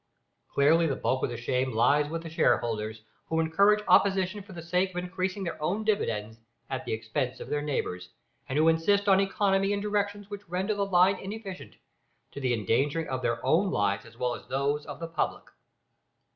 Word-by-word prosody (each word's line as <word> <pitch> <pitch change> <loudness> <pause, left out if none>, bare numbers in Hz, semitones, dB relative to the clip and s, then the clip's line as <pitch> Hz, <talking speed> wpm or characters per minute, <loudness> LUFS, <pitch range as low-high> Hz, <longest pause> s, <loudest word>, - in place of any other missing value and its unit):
Clearly 160 +4 +3
the 140 - 0
bulk 130 0 -1
of - - +1
the 120 - -5
shame 125 +2 -1
lies 145 +6 +3
with 165 +1 -4
the 165 - -6
shareholders, 110 -7 0 0.2
who 160 - 0
encourage 200 +6 +3
opposition 195 0 +3
for 195 +1 -14
the 175 -2 -7
sake 180 +3 +1
of 185 - -17
increasing 185 +2 -3
their 170 -4 -5
own 195 +8 -1
dividends 115 - -1 0.3
at 130 - -3
the - - -4
expense 125 +4 -2
of - - -8
their 145 0 0
neighbours, 90 -11 -3 0.4
and 135 - -1
who 155 +1 +4
insist 200 +6 +3
on 195 -1 +6
economy 195 0 +1
in 200 - -1
directions 205 -1 -2
which 205 -1 -9
render 190 +4 0
the 200 -1 -1
line 185 +1 +4
inefficient 195 -2 -7 0.6
to - - -7
the 130 -2 0
endangering 135 - 0
of 130 -1 -2
their 120 -1 -1
own 190 +5 +3
lives 100 - 0
as 115 0 -16
well 125 0 0
as - - -9
those 140 +2 -1
of - - -7
the 165 - -4
public. 165 - -2
165 Hz, 195 wpm, -28 LUFS, 130-195 Hz, 0.6 s, on